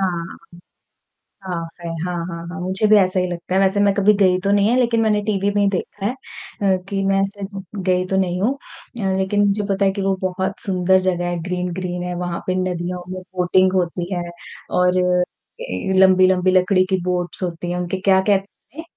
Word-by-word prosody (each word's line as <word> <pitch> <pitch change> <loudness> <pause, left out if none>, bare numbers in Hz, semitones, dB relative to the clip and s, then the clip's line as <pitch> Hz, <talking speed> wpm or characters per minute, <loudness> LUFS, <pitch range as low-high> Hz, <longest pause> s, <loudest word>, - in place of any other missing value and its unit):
हाँ, 175 -3 -2 1.1
साफ़ 170 -2 -6
है। 170 - -5 0.2
हाँ, 180 -1 -3
हाँ, 170 -1 -7
हाँ। 180 +2 -7
मुझे 190 +4 0
भी 210 0 +6
ऐसा 185 -1 +2
ही 180 - 0
लगता 175 +1 -5
है, 190 - +4
वैसे 195 +1 +2
मैं 200 -1 +3
कभी 205 +1 +4
गई 185 -2 +4
तो 200 - +1
नहीं 205 +1 +3
है 245 - +3
लेकिन 235 -2 +2
मैंने 215 -2 +2
टीवी 200 -1 0
में 205 - +3
ही 200 - +3
देखा 195 +1 -4
है 215 - +1
अ, 200 -7 -3
कि 195 -1 -1
मैं 195 0 +2
ऐसे 195 +1 -3
ज 195 -1 -7
गई 185 -1 0
तो 190 - 0
नहीं 180 -1 0
हूँ 235 +7 +2
अ, 200 -7 -5
लेकिन 190 +2 +1
मुझे 205 +1 0
पता 195 +1 +1
है 195 - +3
कि 200 +1 -4
वो 195 0 +1
बहुत 190 +1 -2
सुंदर 190 -2 +2
जगह 175 -1 0
है, 175 -1 -2
ग्रीन-ग्रीन 180 0 -3
है, 180 0 -3
वहाँ 175 -1 -3
पे 185 - 0
नदियों 180 -1 -2
में 185 - -6
बोटिंग 185 +1 +3
होती 175 0 -1
है 175 -1 -2 0.5
और 180 0 +3 0.7
के 190 - -3
लंबी-लंबी 185 -1 +5
लकड़ी 185 0 +3
की 190 - +2
बोट्स 180 0 -2
होती 175 -1 -3
हैं, 180 - -2
उनके 180 +1 -2
क्या 190 -1 +4
कहते 200 +7 -2
हैं? - - -5
185 Hz, 210 wpm, -20 LUFS, 180-195 Hz, 1.1 s, भी